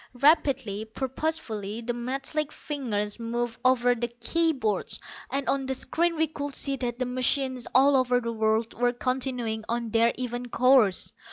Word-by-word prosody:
Rapidly, 265 -8 +3
purposefully, 235 -4 -3
the 240 +1 -2
metallic 270 +5 -2
fingers 220 -8 -2
moved 235 0 -3
over 245 -1 +4
the 240 0 -2
key 245 +8 0
boards, 220 -9 -1 0.3
and 275 0 -2
on 270 -1 0
the 265 - -1
screens 335 +5 0
we 320 - +3
could 285 -2 -6
see 275 -1 +2
that 240 -2 -3
the 255 - -1
machines 255 0 +1
all 275 +2 +6
over 250 -1 +3
the 230 -1 -4
world 220 +1 +1
were 245 0 +1
continuing 250 -3 -2
on 235 -1 -2
their 230 +1 +4
even 245 -1 -4
course. 250 -5 +3
250 Hz, 160 wpm, -27 LUFS, 230-270 Hz, 0.3 s, all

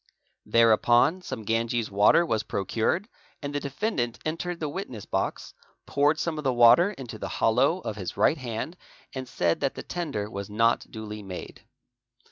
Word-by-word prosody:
Thereupon 120 +8 +4
some 110 -10 -6
Ganges 115 +1 -1
water 105 +12 +5
was 110 -9 0
procured, 110 - -1 0.3
and 145 -1 -5
the 145 - 0
defendant 140 - -2
entered 170 +2 -3
the 155 - -2
witness 145 - -6
box, - - -3 0.3
poured 145 +2 +2
some 160 -1 -2
of - - -5
the 135 - +2
water 120 +10 +6
into 130 - -8
the - - -4
hollow 130 +9 +2
of 110 - -5
his 95 -3 -5
right 155 - +3
hand 125 +7 -5 0.4
and 130 -2 -5
said 85 -8 +1
that 135 -2 -1
the - - -6
tender 145 -13 -3
was 100 -2 -6
not 115 +3 +1
duly 105 -1 -7
made. 95 -3 -9
120 Hz, 165 wpm, -27 LUFS, 110-155 Hz, 0.4 s, water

